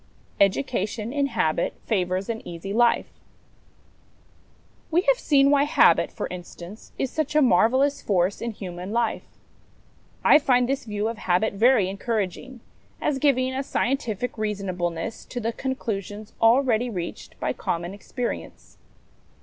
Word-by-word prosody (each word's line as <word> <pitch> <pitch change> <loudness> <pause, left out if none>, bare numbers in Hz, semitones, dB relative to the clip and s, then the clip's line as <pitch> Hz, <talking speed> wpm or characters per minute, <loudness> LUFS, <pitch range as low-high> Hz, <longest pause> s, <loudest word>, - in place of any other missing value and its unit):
Education 215 +2 0
in 285 -1 +1
Habit 170 - 0
favours 185 -2 -1
an 225 -1 -3
Easy 175 +4 -6
Life. 235 +1 +2 1.7
V. 340 +3 +4
T - - -14
e - - -16
have - - +4
seen 280 -1 +4
why 285 0 +4
Habit, 295 - +4
for - - -4
instance, 180 +2 -10
is 265 - -2
such 310 -1 -2
a 305 - +6
marvellous 260 +7 +3
force 190 -1 0
in 235 - -2
human 185 -3 -7
life. 230 0 -1 1.0
I - - +7
find 250 -4 +3
this 270 -1 -2
view 210 -1 -2
of 230 -1 -4
habit 185 +4 +1
very 220 -1 +4
encouraging, 220 +4 -3 0.4
as 275 -2 -1
giving 260 -2 +2
a 265 - -1
scientific 250 -4 -2
reasonableness 185 -4 -3
to 245 - -5
the 230 0 -2
conclusions 215 -6 -4
already 240 0 +4
reached 180 -6 -6
by - - -1
common 170 +2 -3
experience. 240 +4 -6
225 Hz, 140 wpm, -24 LUFS, 195-260 Hz, 1.7 s, I